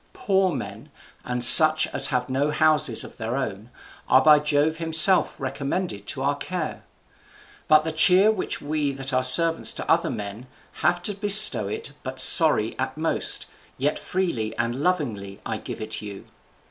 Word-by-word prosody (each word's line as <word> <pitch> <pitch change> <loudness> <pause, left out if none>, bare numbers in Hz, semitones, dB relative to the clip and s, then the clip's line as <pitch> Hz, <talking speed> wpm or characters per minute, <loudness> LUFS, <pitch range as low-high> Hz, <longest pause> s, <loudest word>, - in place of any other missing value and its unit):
Poor 190 -2 -1
men, 135 -6 -9 0.3
and 125 -1 -3
such 155 +4 +8
as 135 - +3
have 125 -3 -3
no 135 +3 -3
houses 150 -5 0
of - - -14
their 115 +2 -6
own, 110 -4 -7 0.4
are 130 - +3
by 150 -1 +4
Jove 150 +2 -1
himself 165 +3 +2
recommended 140 +7 -6
to 135 -3 -5
our 140 +1 -1
care. 160 +3 -7 0.8
But 155 0 +3
the 160 - -5
cheer 185 +6 +3
which 215 - -6
we 145 -1 -4
that 135 0 -6
are 130 - 0
servants 165 +6 +2
to - - -8
other - - 0
men 105 +4 -9 0.3
have 175 +3 -1
to 205 - -2
bestow 205 +1 +4
is 440 +1 -8
but - - -9
sorry - - +5
at - - -5
most, - - -3 0.3
yet - - -3
freely 170 -13 -5
and 120 0 -3
lovingly 115 - -4
I - - -5
give - - -10
it 110 - -7
you. 100 -2 -11
150 Hz, 165 wpm, -21 LUFS, 130-170 Hz, 0.8 s, such